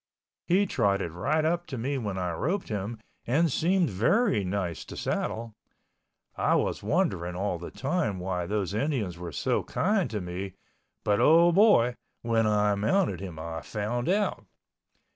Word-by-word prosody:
He 190 +4 +4
trotted 100 - 0
right 150 - 0
up 175 +2 0
to 135 -5 -5
me 135 +4 -2
when 100 -5 -3
I 90 -1 -1
roped 175 - -2
him 105 +2 -3 0.3
and 155 +6 +2
seemed 175 +4 +2
very 175 - +2
nice 90 -4 -2
to - - -9
saddle. 115 0 -2 0.8
I - - +2
was - - 0
wondering 85 +1 0
all 95 -2 -2
the 85 - -7
time 140 - -1
why 90 -1 -2
those 100 -2 -1
Indians 110 - -1
were 90 -1 -6
so - - 0
kind 195 -1 0
to 110 - -3
me, 90 +1 -5 0.5
but 105 -1 +2
oh 170 +2 +6
boy, 170 - +5 0.3
when 115 -1 +2
I 105 -1 +3
mounted 110 - +1
him 90 -4 -7
I 80 0 -5
found 115 - -3
out. 205 +2 0
110 Hz, 160 wpm, -28 LUFS, -, 0.8 s, oh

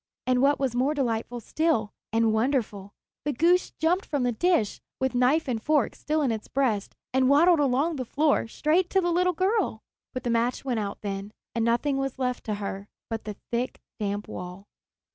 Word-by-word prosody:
And 255 0 +2
what 280 +1 +4
was 265 -3 0
more 265 +5 +1
delightful 240 -3 -1
still, 235 -4 0 0.2
and 225 0 +3
wonderful, 220 -5 -1 0.3
the 295 - -1
goose 345 +7 +3
jumped 350 +5 +2
from 285 -4 -1
the 245 - +2
dish, 235 - +1 0.2
with 265 0 0
knife 255 +6 +3
and 235 -4 -1
fork 300 +3 +2
still 305 0 -1
in 260 - +2
its 220 -1 -4
breast, 235 -8 0 0.2
and 260 0 +3
waddled 330 +4 +6
along 285 +4 +2
the 255 - -2
floor 290 -1 +2
straight 320 +9 +1
to 385 - +3
the 350 -1 +1
little 360 +1 +2
girl. 375 - 0 0.3
But 255 -1 -5
the 240 - 0
match 235 +3 0
went 245 -4 0
out 200 -1 -4
then, 200 0 -5 0.2
and 230 - 0
nothing 240 +5 +1
was 270 -1 -2
left 250 -1 -2
to 215 - -1
her 200 -1 -5 0.2
but 225 -1 -3
the 210 -1 -5 0.2
thick, 245 +2 -2 0.2
damp 205 0 -2
wall. 180 +2 -7
255 Hz, 195 wpm, -27 LUFS, 220-300 Hz, 0.3 s, waddled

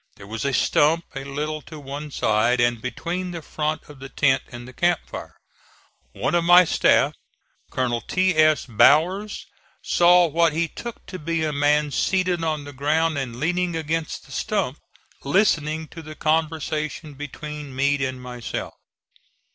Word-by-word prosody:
There 100 - -12
was 110 +5 -5
a 140 - +1
stump 155 +5 +2
a 135 -1 -5
little 150 +3 -4
to 155 +1 -11
one 145 +2 -7
side, 120 -1 +1
and 120 -1 +2
between 175 +8 -4
the 170 -2 -6
front 155 +1 -2
of 145 -2 -13
the 135 0 -9
tent 135 -2 +2
and 120 +1 -10
camp 175 -1 +2
fire. - - -9 0.8
One - - -2
of 175 -1 +3
my 175 +1 +7
staff, - - +3 0.6
Colonel 120 -2 -1
T. 185 -1 +1
S. 155 -1 +4
Bowers, 170 - +3 0.4
saw 175 0 +5
what 165 0 +2
he 165 +2 0
took 235 +7 -9
to 185 - -8
be 165 +1 -1
a 155 -1 -1
man 145 +1 +2
seated 180 +3 0
on 155 -2 -1
the 145 0 -9
ground 155 +3 +1
and 120 -3 -5
leaning 175 +3 0
against 160 0 -3
the 135 - -16
stump, 185 -5 -2 0.4
listening 160 -2 +1
to 165 - -9
the 155 -1 -10
conversation 155 -1 -1
between 145 0 -7
Meade 140 +1 +1
and 130 -1 -2
myself. 125 -2 -6
155 Hz, 160 wpm, -23 LUFS, 135-165 Hz, 0.8 s, my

